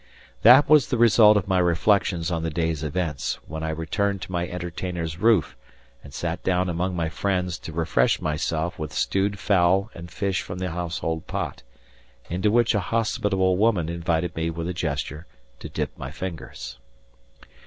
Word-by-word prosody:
That 125 +6 +8
was 150 -2 +5
the 125 - -1
result 110 -2 +6
of 95 - -1
my 95 -1 +2
reflections 90 0 +2
on 85 -1 -1
the 80 - -2
day's 80 -1 -2
events 75 -2 -2
when 80 0 -6
I 80 - -2
returned 95 +4 -1
to 85 - -8
my 90 -1 -1
entertainer's 85 -2 -5
roof 110 -6 +3 0.5
and 70 - -12
sat 85 +4 -3
down 90 0 +1
among 90 +2 -1
my 85 -2 -1
friends 90 +1 -2
to - - -8
refresh 80 -6 +1
myself 80 +2 -2
with 75 -1 -5
stewed 100 +1 0
fowl 95 +1 +2
and 85 +1 -9
fish 95 +2 -1
from 90 - -7
the 90 -1 -3
household 80 -1 -3
pot, - - -4 0.7
into 95 +4 +1
which 120 +1 +3
a 105 - +2
hospitable 100 -3 0
woman 100 -6 +2
invited 85 0 -1
me 80 0 -1
with 85 0 -4
a 90 - -2
gesture 75 -1 -3 0.3
to - - -8
dip - - -3
my 65 - -5
fingers. 70 -7 -7
90 Hz, 170 wpm, -24 LUFS, 80-95 Hz, 0.7 s, That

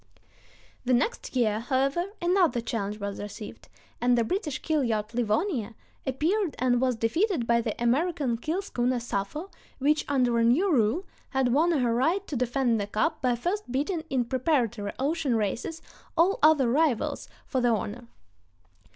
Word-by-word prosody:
The 250 0 +3
next 350 - -1
year, 215 -4 +2
however, 270 +7 0 0.2
another 350 -7 +3
challenge 210 -3 -3
was 200 -1 -4
received, 205 +1 -9 0.3
and 245 0 +3
the 235 - +3
British 305 - -2
keel 310 -3 +1
yacht 220 -2 -1
Livonia 235 - -1 0.3
appeared 325 +7 0
and 245 -1 +2
was 255 -2 +2
defeated 250 - 0
by 235 0 +3
the 225 -2 -4
American 265 +1 +1
keel 325 +11 -2
schooner 250 -8 0
Sappho, 240 - -4 0.3
which, 295 +3 +2
under 250 -4 +2
a - - +3
new 320 +11 +3
rule, 250 - +2 0.2
had 265 -3 +1
won 320 +5 +3
her 250 -8 +2
right 330 +11 +1
to 295 - -5
defend 245 -2 +1
the 200 - -3
cup 215 +10 -1
by 250 -3 +2
first 355 - -3
beating 305 +6 -1
in 255 -3 +1
preparatory 240 -5 0
ocean 285 -1 0
races 230 - -2 0.3
all 360 +4 +3
other 300 -4 +5
rivals 275 -1 +1 0.2
for 260 - -1
the 245 - +3
honor. 230 +2 -2
255 Hz, 160 wpm, -27 LUFS, 230-315 Hz, 0.3 s, other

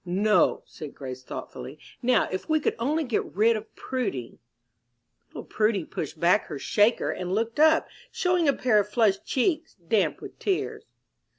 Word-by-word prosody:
"No," 200 +4 +2
said 150 -2 -10
Grace, 130 -2 -7
thoughtfully. 130 +2 -8 0.2
"Now 250 +1 +3
if 185 +9 -4
we 310 0 +3
could - - 0
only 300 +7 0
get 245 -6 0
rid 225 +3 +4
of 215 0 -8
Prudy 210 - -4 0.5
" 120 -1 -50
Little - - -9
Prudy 215 -4 0
pushed 155 0 -6
back 180 +6 +3
her 150 - -5
"shaker," 210 - +2
and 180 -1 -4
looked 230 +5 -2
up, 315 +1 +5 0.2
showing 360 -3 +1
a 280 - +5
pair 245 -5 +3
of 205 - -1
flushed 210 -4 +2
cheeks 315 +4 0
damp 190 +3 0
with - - -11
tears. 390 -3 -2
215 Hz, 170 wpm, -26 LUFS, 175-255 Hz, 0.5 s, up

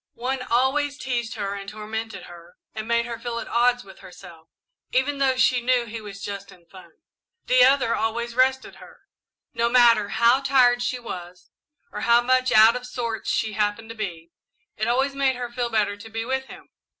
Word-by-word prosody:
One 255 +2 -3
always 265 +4 0
teased 245 -4 -3
her 200 -2 -3
and 200 -1 -7
tormented 220 +1 -6
her 175 0 -14 0.2
and 215 0 -6
made 235 0 +1
her 235 -1 -6
feel 235 0 -5
at - - -5
odds 245 +1 +2
with 195 - -15
herself, 165 -2 -14 0.4
even 275 +2 0
though 265 -1 +2
she 255 -1 +3
knew 245 0 +1
he 225 0 -7
was 200 -2 -10
just 200 -1 -6
in 175 -2 -19
fun. 185 +2 -15 0.6
"The 255 0 +5
other 260 -3 +3
always 235 +2 -2
rested 260 +1 +1
her. - - -16 0.5
No 235 0 +1
matter 235 -4 +5
how 235 +5 +3
tired 255 -3 +3
she 245 +1 -1
was, 180 -6 -9 0.4
or - - -6
how 235 0 +5
much 255 +1 +2
out 220 +2 +7
of 250 0 -6
sorts 230 -3 -4
she 220 -1 -1
happened 210 +2 -2
to 225 - -8
be, 170 -6 -6 0.4
it 220 - -2
always 265 +4 +1
made 275 -1 +1
her 245 -1 -6
feel 240 0 -2
better 210 -3 0
to 215 +2 -12
be 225 +1 -4
with 265 +1 -2
him. - - -14
235 Hz, 195 wpm, -24 LUFS, 215-255 Hz, 0.6 s, out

